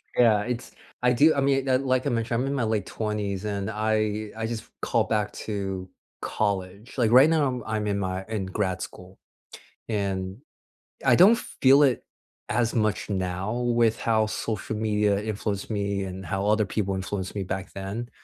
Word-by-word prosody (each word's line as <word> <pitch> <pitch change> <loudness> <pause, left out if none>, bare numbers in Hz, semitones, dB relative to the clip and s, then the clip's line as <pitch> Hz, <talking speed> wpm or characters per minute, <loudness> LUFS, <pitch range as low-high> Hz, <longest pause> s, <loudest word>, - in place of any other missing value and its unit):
Yeah. 110 -4 +5
It's 125 +1 -4 0.3
I 125 0 +4
do 150 +6 +5
I 140 - 0
mean, 135 -1 +2
like 130 -1 +2
like 130 -1 +1
I - - +2
mentioned, 115 0 0
I'm - - 0
in 140 - -1
my 135 -4 0
late 110 -3 0
20s, 105 -2 -3
and 100 -2 -2
I 110 0 0
I 110 - -2
just 115 -1 -4 0.2
called - - +1
back 105 -1 0
to 95 -3 -3 0.3
college. 100 +1 -2
Like, 115 -3 +3
right 130 +5 +8
now, 140 -6 +1
I'm 110 -1 -2
in 100 -1 0
my 95 -1 -2
in 105 -4 -2
grad 95 -1 -2
school. - - -9 0.7
And 95 -3 -2 0.7
I - - +6
don't 205 +7 +7
feel 135 -6 +4
it 130 -4 +2 0.5
as 115 +1 +1
much 110 -3 0
now 95 +1 -2
with 120 -2 +2
how 110 -2 +2
social 110 0 -3
media 105 -2 +1
influenced 105 -1 -3
me 100 -1 -1
and 95 0 -6
how 95 +4 -2
other 105 +1 +3
people 100 -1 -1
influenced 95 0 -4
me 100 - -1
back 95 +1 -5
then. 100 +5 -5
105 Hz, 180 wpm, -26 LUFS, 100-120 Hz, 0.7 s, right